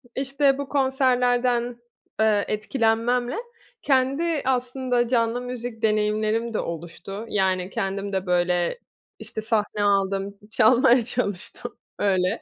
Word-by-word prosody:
işte, 275 Hz, +1 st, +1 dB
bu 280 Hz, -1 st, -5 dB
konserlerden, 250 Hz, -3 st, +1 dB, 0.4 s
eee, 215 Hz, -2 st, +3 dB
etkilenmemle 230 Hz, +2 st, 0 dB, 0.5 s
kendi 280 Hz, +4 st, +1 dB
aslında 250 Hz, -1 st, 0 dB
canlı 230 Hz, 0 st, +1 dB
müzik 245 Hz, -2 st, -6 dB
deneyimlerim 215 Hz, +1 st, +1 dB
de -, -, 0 dB
oluştu. 175 Hz, +5 st, -6 dB
Yani, 185 Hz, -2 st, 0 dB
kendim 195 Hz, +1 st, -3 dB
de, 190 Hz, 0 st, -1 dB
böyle, 180 Hz, -, +1 dB, 0.4 s
işte, 220 Hz, -, -6 dB
sahne 215 Hz, -2 st, 0 dB
aldım, 195 Hz, 0 st, +1 dB
çalmaya 240 Hz, +1 st, +5 dB
çalıştım 215 Hz, -6 st, -4 dB, 0.2 s
öyle. 185 Hz, -2 st, +1 dB
225 Hz, 105 wpm, -24 LUFS, 200-250 Hz, 0.5 s, çalmaya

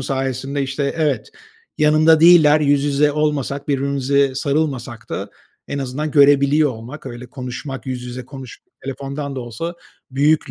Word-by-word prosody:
sayesinde 135 Hz, +1 st, -2 dB
işte, 140 Hz, +1 st, -2 dB
evet, 155 Hz, -, -1 dB, 0.5 s
yanımda 155 Hz, +1 st, +5 dB
değiller, 160 Hz, -3 st, +7 dB
yüz 145 Hz, -1 st, +2 dB
yüze 145 Hz, +1 st, +2 dB
olmasak, 145 Hz, -2 st, -1 dB
birbirimize 140 Hz, 0 st, +1 dB
sarılmasak 135 Hz, -5 st, -2 dB
da -, -, -4 dB, 0.4 s
en 140 Hz, -, -3 dB
azından 140 Hz, +3 st, -3 dB
görebiliyor 145 Hz, +1 st, +4 dB
olmak, 125 Hz, +5 st, -9 dB
öyle 120 Hz, 0 st, -8 dB
konuşmak, 130 Hz, +2 st, -7 dB
yüz 125 Hz, -1 st, -4 dB
yüze 125 Hz, +1 st, -7 dB
konuş 135 Hz, -3 st, -10 dB, 0.2 s
telefondan 140 Hz, +1 st, -5 dB
da -, -, -3 dB
olsa 125 Hz, +9 st, -5 dB, 0.4 s
büyük 145 Hz, +4 st, +2 dB
140 Hz, 135 wpm, -19 LUFS, 130-150 Hz, 0.5 s, değiller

